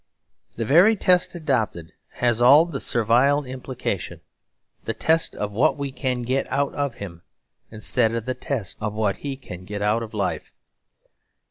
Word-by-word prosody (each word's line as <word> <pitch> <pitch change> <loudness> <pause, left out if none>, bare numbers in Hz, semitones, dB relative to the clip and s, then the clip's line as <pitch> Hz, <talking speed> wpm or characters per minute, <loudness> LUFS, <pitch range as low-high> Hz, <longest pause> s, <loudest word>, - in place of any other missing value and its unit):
The 115 - -3
very 175 - +6
test 180 -2 +2
adopted 120 - -2 0.2
has 120 -1 0
all 140 +7 +7
the 160 -6 -5
servile 125 +6 +2
implication; 130 0 -5 0.6
the - - -3
test 160 0 +2
of 105 0 -3
what 140 +10 +2
we 140 -1 -4
can 130 -2 -2
get 130 +3 -1
out 140 0 0
of 140 -4 -2
him, 85 -4 -9 0.5
instead 110 +1 +1
of 115 -1 -3
the 130 - -1
test 125 -8 -4
of 105 0 -2
what 105 -2 0
he 140 -2 -5
can 90 -9 -10
get 105 +2 -5
out 105 +3 +1
of 110 -1 -7
life. 100 -2 -3
125 Hz, 160 wpm, -23 LUFS, 110-140 Hz, 0.6 s, all